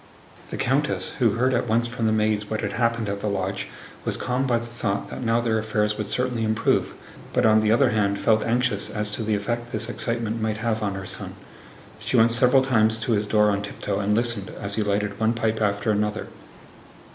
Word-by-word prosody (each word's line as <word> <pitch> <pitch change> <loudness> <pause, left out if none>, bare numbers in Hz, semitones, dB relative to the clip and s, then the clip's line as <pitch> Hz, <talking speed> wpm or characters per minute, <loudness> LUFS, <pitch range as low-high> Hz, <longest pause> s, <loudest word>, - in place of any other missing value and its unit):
The - - -5
countess, - - 0
who - - +3
heard 130 +3 +1
at 120 - 0
once 115 +2 +2
from 115 -1 -2
the - - +2
maids 105 -1 0
what 110 - -2
had 100 -2 -2
happened 115 -1 0
at 100 0 -3
the 105 - -3
lodge, 95 0 -2 0.4
was - - -1
calmed 130 +2 -1
by 120 -2 +2
the 120 - -5
thought 110 -4 -3
that - - -7
now 115 -1 +2
their 115 -2 +1
affairs 105 -1 0
would 105 -1 -3
certainly 125 +1 -1
improve, 110 0 +1 0.4
but - - +2
on 110 0 +5
the 110 0 +2
other 125 +2 +4
hand 100 -2 +1
felt 110 +1 +2
anxious 115 -3 0
as 105 -1 -3
to 105 - -4
the 110 -1 0
effect 120 +4 -3
this 115 - -3
excitement 115 -2 -2
might 110 -1 -1
have 110 -1 -1
on 100 -2 -2
her 95 0 -6
son. - - -6 0.6
She 110 +3 -1
went 115 0 +5
several 125 +3 +6
times 110 -3 +2
to 115 - -2
his 105 -1 +1
door 105 0 +3
on 100 0 -1
tiptoe 100 -1 -4
and 100 +1 +1
listened, 115 -4 0
as 100 0 -3
he 110 - 0
lighted 105 -1 -1
one 110 +1 +2
pipe 110 -1 -1
after 105 +1 +1
another. 105 0 -1
110 Hz, 220 wpm, -24 LUFS, 105-115 Hz, 0.6 s, several